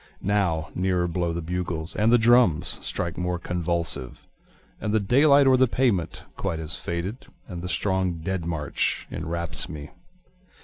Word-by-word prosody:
Now 95 -6 0
nearer 90 -1 +1
blow 85 0 -1
the 85 0 -4
bugles, 85 -1 -3
And 110 +2 +3
the 120 - +7
drums 110 -8 +3
strike 85 0 -3
more 90 0 -1
convulsive, 85 -6 -2 0.5
And 105 +1 -1
the - - +4
daylight 140 +7 +5
oâer 130 -1 +5
the 130 - +5
pavement 95 -8 0
quite 95 -4 -2
has 80 0 -3
faded, 95 +10 -5 0.2
And 90 -4 -6
the 90 - -5
strong 95 -2 0
dead 85 +2 -3
march 80 -3 -1
enwraps 85 0 -3
me. 75 -1 -8
90 Hz, 150 wpm, -25 LUFS, 85-105 Hz, 0.5 s, the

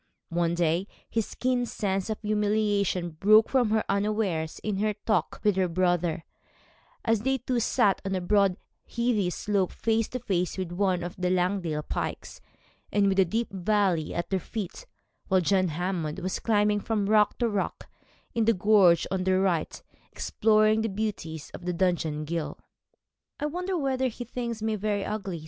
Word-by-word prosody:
One 170 0 0
day 170 +2 +1 0.3
this 225 -2 -1
keen 250 -1 0
sense 195 -2 -2
of 215 - -2
humiliation 205 -4 +1
broke 215 +7 +5
from 250 -5 +2
her 220 0 +2
unawares 200 -6 -1
in 210 -2 -1
her 210 +1 0
talk 215 +1 -1
with 210 -2 +3
her 185 -1 +2
brother, 175 -1 0 0.8
as 225 -2 +3
they 265 +3 +1
two 250 0 -1
sat 205 -3 +2
on 195 -1 -2
a - - 0
broad 195 0 +2 0.3
heathy 235 -6 0
slope 195 0 -1
face 225 -1 0
to 255 - -5
face 185 -7 -1
with 185 -2 -3
one 185 -1 0
of 175 +1 -5
the 180 -1 0
Langdale 180 -4 0
pikes, - - -5 0.5
and 200 -1 +3
with 195 0 +1
a 190 - +6
deep 225 +5 -2
valley 190 -4 +1
at 170 - -3
their 190 - +2
feet, 220 - -6 0.4
while 190 -1 +3
John 185 +1 +2
Hammond 170 -1 -2
was 185 0 -3
climbing 210 -2 +2
from 210 -1 -1
rock 210 -1 +3
to 240 - +1
rock 205 -3 -3 0.5
in 230 -1 +1
the 230 0 +4
gorge 185 -3 +5
on 190 -1 0
their 185 0 +2
right, 180 -5 0 0.3
exploring 215 0 +2
the 225 - -1
beauties 190 -7 -4
of 180 -1 -4
Dungeon 165 -4 0
Ghyll. 165 0 -3 0.8
'I 295 - -2
wonder 360 +4 -2
whether 265 -3 0
he 245 0 -6
thinks 235 -2 -4
me 220 -1 0
very 205 -1 -1
ugly?' 195 -5 -4
200 Hz, 170 wpm, -27 LUFS, 180-220 Hz, 0.8 s, a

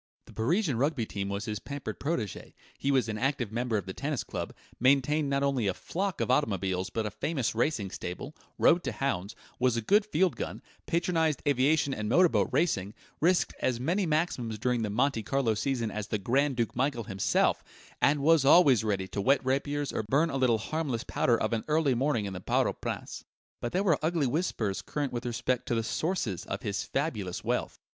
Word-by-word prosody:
The - - -15
Parisian 145 - +1
Rugby 140 -4 +1
team 100 -2 -4
was 100 +1 -3
his 105 -1 -3
pampered 140 +5 -6
protégé, 140 - -3 0.2
he 140 - -2
was 130 -4 +3
an 110 -1 -3
active 135 -5 -1
member 120 0 0
of 100 - -3
the 95 - -6
Tennis 145 +2 -2
Club, - - -5 0.3
maintained 140 +3 +3
not 140 0 +1
only 135 -6 +1
a 95 - 0
flock 190 0 -3
of - - 0
automobiles 95 -8 0
but 110 -1 -2
a 105 - -3
famous 135 -9 -1
racing 110 -5 0
stable, 90 - -6 0.2
rode 175 +1 +4
to 130 - -2
hounds, 105 -4 -2 0.2
was 125 -2 +2
a - - 0
good 205 - +4
field 190 -3 +1
gun, - - -5 0.2
patronized 165 -3 +1
aviation 140 +1 +3
and 105 -3 -3
motor 180 -1 +5
boat 105 -7 +1
racing, 125 - 0 0.2
risked 175 +3 +2
as 125 -2 0
many 175 +9 0
maximums 150 -8 -1
during 120 +2 0
the 110 - -1
Monte 120 +3 +1
Carlo 120 +1 +1
season 115 0 -1
as 105 0 -4
the 105 - -1
Grand 135 +7 +1
Duke 115 -2 -1
Michael 125 -1 0
himself, 95 -1 +1 0.4
and 145 0 +3
was 160 -1 +5
always 140 - +6
ready 100 -3 -1
to 100 +3 -3
whet 135 +5 +3
rapiers 145 +2 -1
or - - 0
burn 140 +10 +1
a 135 - -1
little 125 -4 +3
harmless 130 0 -2
powder 120 -2 +1
of - - -1
an 110 - -1
early 150 -3 +2
morning 125 -3 0
in 100 - -4
the 90 - -6
Parc - - +2
aux - - -1
Princes. - - -5 0.4
But 120 - -3
there 190 +2 +1
were 170 -7 +3
ugly 160 -2 +1
whispers 120 - -1
current 145 -3 -3
with 120 +1 -3
respect 120 +1 -1
to 120 - 0
the 115 - 0
sources 120 - -2
of - - -5
his 105 0 -1
fabulous 110 - -2
wealth. - - -1
130 Hz, 205 wpm, -29 LUFS, 110-150 Hz, 0.4 s, always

